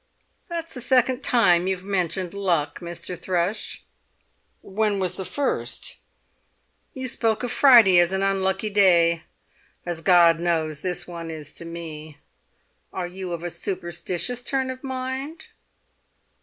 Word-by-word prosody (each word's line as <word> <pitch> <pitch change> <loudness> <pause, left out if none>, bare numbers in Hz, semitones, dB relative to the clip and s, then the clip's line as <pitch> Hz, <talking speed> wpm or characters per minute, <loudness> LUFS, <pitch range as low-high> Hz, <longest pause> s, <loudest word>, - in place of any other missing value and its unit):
"That's 335 -1 -5
the 250 - -6
second 255 +1 +2
time 180 -7 +4
you've 190 -1 -2
mentioned 185 -2 -1
luck, 175 -7 0
Mr. 170 +1 -6
Thrush!" 180 +3 -2 0.8
"When 210 +1 0
was 185 -2 -2
the 190 - -4
first?" 285 +7 -3 1.0
"You 260 -1 -4
spoke 225 -1 0
of 245 - -2
Friday 230 -10 +7
as 175 +1 +4
an 190 0 0
unlucky 195 +1 0
day, 170 -4 +4 0.6
as 175 -2 -4
God 170 -1 +5
knows 160 -3 -1
this 180 0 -3
one 170 -2 -7
is 155 -2 -6
to 170 - -8
me! 160 -3 -8 0.7
Are 185 - -3
you 180 0 -6
of 170 -1 -4
a 175 - -3
superstitious 180 +6 -3
turn 260 +1 -1
of 260 +1 -10
mind?" 265 +4 -4
185 Hz, 135 wpm, -24 LUFS, 170-230 Hz, 1.0 s, Friday